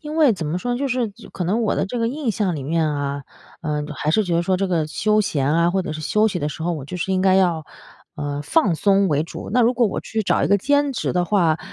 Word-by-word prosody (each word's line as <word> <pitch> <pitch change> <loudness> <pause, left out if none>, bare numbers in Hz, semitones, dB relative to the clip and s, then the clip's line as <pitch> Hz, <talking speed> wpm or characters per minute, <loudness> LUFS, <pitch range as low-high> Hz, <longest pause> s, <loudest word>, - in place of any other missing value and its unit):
因 300 0 -7
为 305 -6 +5
怎 175 -6 -4
么 155 +4 -1
说 245 +6 -2
呢， - - -3
就 280 - -1
是 250 -3 0
就 195 - -15
可 180 - -5
能 200 +7 0
我 215 - +1
的 - - 0
这 240 +4 -4
个 230 - +1
印 265 -1 -2
象 195 -4 -1
里 140 - -5
面 160 +2 0
啊， 140 -1 -3 0.4
呃， 150 -2 -2
还 150 +4 -1
是 215 - +3
觉 175 -3 0
得 170 - +2
说 185 +1 +1
这 195 0 -1
个 165 -4 0
休 215 +6 +1
闲 150 -10 0
啊， 170 +1 +3
或 190 - +1
者 165 - -4
是 155 - -6
休 215 +7 +2
息 190 - -3
的 150 -2 -2
时 160 - -7
候， 175 +1 0
我 150 -5 -5
就 160 +6 -6
是 190 +2 -2
应 185 - +1
该 190 0 +4
要， 175 -5 +2 0.5
呃， 145 -1 -4
放 190 - +2
松 195 +2 +3
为 150 -1 +1
主。 - - -8
那 245 - +3
如 240 +2 +3
果 240 -2 +3
我 - - -3
去 220 -1 -3
找 - - +1
一 - - 0
个 200 - +5
兼 285 +6 +1
职 - - -2
的 180 -1 +1
话， 170 -5 +2
185 Hz, 315 characters per minute, -21 LUFS, 155-220 Hz, 0.5 s, 为